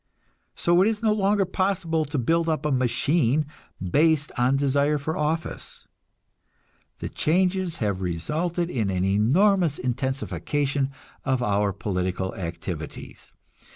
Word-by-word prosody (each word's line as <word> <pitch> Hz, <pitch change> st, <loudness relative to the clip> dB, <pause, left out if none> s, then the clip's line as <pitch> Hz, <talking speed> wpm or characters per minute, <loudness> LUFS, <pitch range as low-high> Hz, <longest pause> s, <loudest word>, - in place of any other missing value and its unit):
So 175 Hz, +1 st, +3 dB
it 195 Hz, -, +5 dB
is 220 Hz, 0 st, -1 dB
no 215 Hz, -1 st, +4 dB
longer 200 Hz, -1 st, +2 dB
possible 180 Hz, -4 st, 0 dB
to 145 Hz, 0 st, -3 dB
build 165 Hz, +6 st, +1 dB
up 155 Hz, -2 st, -1 dB
a 150 Hz, -, +1 dB
"machine" 135 Hz, +2 st, +2 dB, 0.3 s
based 150 Hz, -, +2 dB
on 125 Hz, +2 st, +2 dB
desire 140 Hz, +2 st, +2 dB
for 155 Hz, +3 st, -3 dB
office. 155 Hz, +2 st, -3 dB, 1.1 s
The -, -, -5 dB
changes 180 Hz, +1 st, +1 dB
have 100 Hz, -, -2 dB
resulted 160 Hz, -, -1 dB
in 110 Hz, -6 st, 0 dB
an 95 Hz, -1 st, 0 dB
enormous 150 Hz, -, +3 dB
intensification 135 Hz, +2 st, -1 dB, 0.3 s
of 130 Hz, -2 st, 0 dB
our 105 Hz, -2 st, +1 dB
political 95 Hz, -1 st, -2 dB
activities. 85 Hz, -3 st, -7 dB
145 Hz, 120 wpm, -25 LUFS, 120-170 Hz, 1.1 s, it